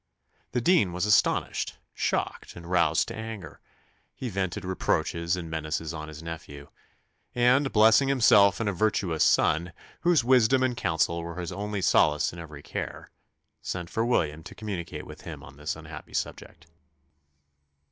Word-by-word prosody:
The 125 - +1
dean 135 - +3
was 90 +2 -1
astonished, 105 - +1 0.2
shocked, - - -2
and 85 - -10
roused 85 -3 +2
to - - -6
anger: 110 -3 -7 0.6
he 130 - -5
vented 95 0 -3
reproaches 85 -2 0
and 90 -2 -6
menaces 80 0 -3
on 75 -1 -6
his 75 +1 -10
nephew; 70 -4 -8 0.7
and 125 +3 +3
"blessing 110 +5 +5
himself 110 -7 +5
in 115 - -1
a 100 - 0
virtuous 90 -4 +1
son, 85 +2 +2 0.3
whose 170 -6 +3
wisdom 130 +1 +4
and 130 -2 +1
counsel 85 -2 0
were 85 +1 -6
his 85 -2 -4
only 105 -1 -3
solace 75 -3 +3
in 85 - -9
every 75 -3 -10
care," - - -6 0.5
sent 90 -2 -5
for 115 - 0
William 80 -10 0
to - - -11
communicate 100 -6 -5
with - - -11
him - - -8
on 65 +1 -13
this 75 +1 -3
unhappy - - -10
subject. 75 - -5
90 Hz, 155 wpm, -27 LUFS, 80-110 Hz, 0.7 s, blessing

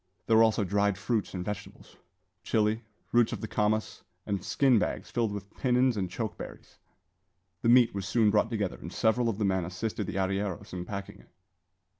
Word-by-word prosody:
There 115 - +3
were 110 - +7
also 110 -2 +4
dried 100 0 +1
fruits 110 -2 -1
and 90 -1 -4
vegetables, 105 -2 -7 0.5
chile, 110 0 +1 0.3
roots 120 -1 +3
of - - -5
the 110 - -3
kamas, 110 +1 0 0.2
and 100 -3 -2
skin 130 -5 +3
bags - - -3
filled 115 -3 0
with 100 0 -7
pinons 125 -1 +2
and 95 -3 -2
choke 110 +4 -4
berries. - - -10 0.8
The 115 - +2
meat 120 -1 +6
was 100 -1 -4
soon 110 -2 +3
brought 105 +2 +2
together, 105 -5 -2
and 85 - -7
several 115 +3 +2
of 105 - -2
the 105 - 0
men 95 -2 +1
assisted 95 +3 -3
the - - -4
arrieros 95 -1 -2
in 90 -1 -4
packing 100 +1 -6
it. - - -20
105 Hz, 190 wpm, -29 LUFS, 100-115 Hz, 0.8 s, were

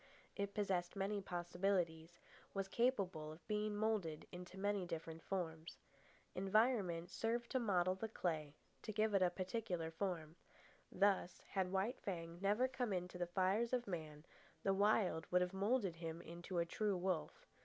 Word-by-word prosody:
It 200 0 -2
possessed 185 -4 0
many 200 +1 0
possibilities, 175 -2 -1 0.4
was 195 0 0
capable 195 -9 +1
of 155 +2 -13
being 210 0 0
moulded 205 -8 0
into 180 +1 -8
many 200 0 +1
different 165 -1 -5
forms. 165 -4 -3 0.6
Environment 195 -3 +2
served 235 +1 -1
to 260 - +2
model 185 -5 +3
the 190 +4 -3
clay, 155 -8 -2 0.3
to 215 - -4
give 215 0 +2
it 195 - +4
a 180 - +6
particular 185 -3 -2
form. 165 -2 -3 0.5
Thus, 195 -2 +2
had 190 -2 +1
White 195 +7 0
Fang 170 -3 -4
never 210 +6 +3
come 255 -3 -1
in 180 -1 0
to 180 - -8
the 175 - 0
fires 195 +7 +2
of 245 -1 +2
man, 155 -4 -5 0.4
the 195 - +3
Wild 200 -4 +3
would 180 0 +5
have 180 +1 0
moulded 200 -2 +1
him 165 0 -4
into 175 +2 -6
a 170 - +3
true 205 +3 0
wolf. 180 -2 -1
185 Hz, 160 wpm, -41 LUFS, 170-205 Hz, 0.6 s, a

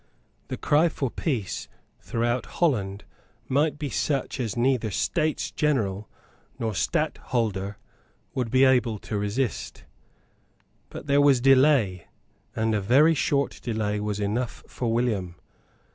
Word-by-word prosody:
The - - -4
cry 155 +4 +3
for 135 -5 -3
peace 120 - -3 0.3
throughout 120 +1 -1
Holland 105 - 0 0.4
might 145 +3 +1
be 145 -3 -4
such 140 -2 -1
as 115 -3 -2
neither 120 -2 +1
States 155 - -1
General 110 -9 0 0.5
nor 115 -4 -2
Stadtholder 100 -1 -1 0.6
would 125 -3 -2
be 130 +3 +4
able 125 -4 +3
to 105 +1 -4
resist. 105 +5 -2 1.1
But - - -8
there 140 0 +3
was 140 -3 +5
delay; 130 - +4 0.5
and 110 0 +1
a 105 - +1
very 140 +11 +5
short 140 -2 0
delay 110 -3 -1
was 105 0 -2
enough 110 +4 -2
for 120 -2 -3
William. 110 -7 -1
120 Hz, 125 wpm, -26 LUFS, 105-135 Hz, 1.1 s, was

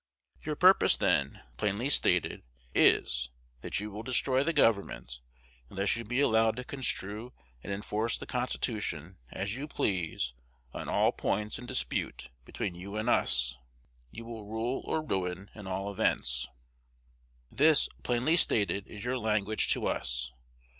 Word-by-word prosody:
Your 150 0 -2
purpose 185 +5 +6
then, - - +1
plainly 105 +5 0
stated, 145 - +3 0.3
is, 60 +1 +3 0.3
that - - -2
you 105 +1 -5
will 105 +2 -6
destroy 130 +2 +2
the 165 - +1
government, 100 - +1 0.5
unless 100 +1 0
you 115 - -4
be 120 +4 -1
allowed 110 -4 +3
to 125 - -5
construe 120 -3 -3 0.3
and 100 - -6
enforce 105 +3 -1
the - - -8
Constitution 105 - -2
as 100 - -3
you 140 +4 -5
please 85 - -1 0.4
on - - -5
all - - +3
points 105 +2 -2
in 125 - -9
dispute - - -2
between 90 - -4
you 95 +4 -8
and 110 +3 +1
us. 60 -1 +2 0.5
You 115 - -9
will 115 -3 -8
rule 115 +4 -2
or 160 - -1
ruin 95 -5 -3
in 105 -3 -10
all 95 +2 -3
events. 60 -10 +1 1.0
This, 155 +2 +5
plainly 125 +7 +2
stated, 100 - +2
is 105 +1 -9
your 125 +1 -1
language 110 -1 +1
to - - -3
us. - - -1
105 Hz, 145 wpm, -30 LUFS, 95-125 Hz, 1.0 s, purpose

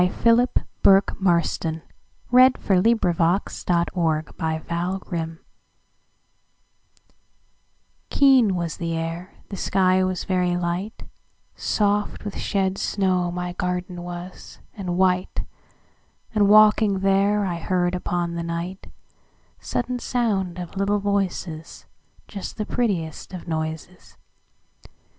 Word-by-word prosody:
Philip 235 +2 +4 0.2
Bourke 195 0 +4
Marston 170 -3 0 0.5
1850–87 185 -7 +3
Garden 165 +2 -2
Fairies 165 -2 -4 2.7
KEEN 260 -8 +5
was 170 -3 -3
the 165 -1 -2
air, 165 +3 -5
the 200 - -5
sky 185 0 +2
was 185 -1 -1
very 180 -1 0
light, 175 +5 -3 0.5
Soft 205 0 0
with 205 - -5
shed 195 -1 -1
snow 185 -3 0
my 180 0 -4
garden 180 0 -3
was, 175 +1 -8 0.2
and 180 -4 -4
white, 185 -1 +1 0.9
And, 205 -2 +3
walking 210 -2 +5
there, 200 +1 +2
I 175 -3 -2
heard 175 +1 0
upon 175 -1 -2
the 170 - -3 1.2
nightSudden 245 +1 -2
sound 195 -8 -1
of 180 0 -7
little 200 +1 +1
voices, 190 -5 -3 0.4
Just 200 -2 -7
the 215 - -2
prettiest 185 -8 -2
of 180 - -9
noises. 160 +2 -5
185 Hz, 100 wpm, -23 LUFS, 175-200 Hz, 2.7 s, KEEN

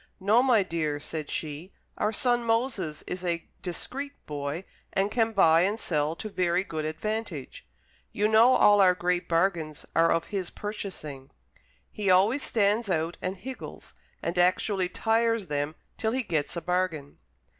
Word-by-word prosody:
"No, 210 +5 +4
my 245 -6 +4
dear," 155 -5 -2
said 155 0 -5
she, 155 +4 -5 0.2
"our 210 - 0
son 240 +1 +1
Moses 225 - -1
is 180 0 -5
a 170 -2 -1 0.2
discreet 270 - -4
boy 145 +3 -4 0.3
and 195 +2 0
can 225 -2 +1
buy 165 -6 +5
and 205 +5 +1
sell 155 -3 0
to 215 - -6
very 180 -2 +1
good 160 -5 -4
advantage; 160 - -4 0.4
you 210 - +1
know 225 +4 +6
all 205 -1 +6
our 180 -1 +5
great 180 0 -1
bargains 165 -3 0
are 165 0 +4
of 165 - +1
his 190 -3 -2
purchasing. 155 -10 -6 0.6
He 210 -3 -2
always 200 +9 +4
stands 210 -1 +1
out 165 -1 -1
and 185 +1 -3
higgles, 255 +7 -9 0.3
and 170 +1 -1
actually 185 +1 +2
tires 225 +1 +1
them 145 0 -2 0.2
till 220 0 0
he 260 0 0
gets 160 -7 -1
a 170 - -3
bargain." 175 -5 -2
185 Hz, 155 wpm, -27 LUFS, 160-215 Hz, 0.6 s, know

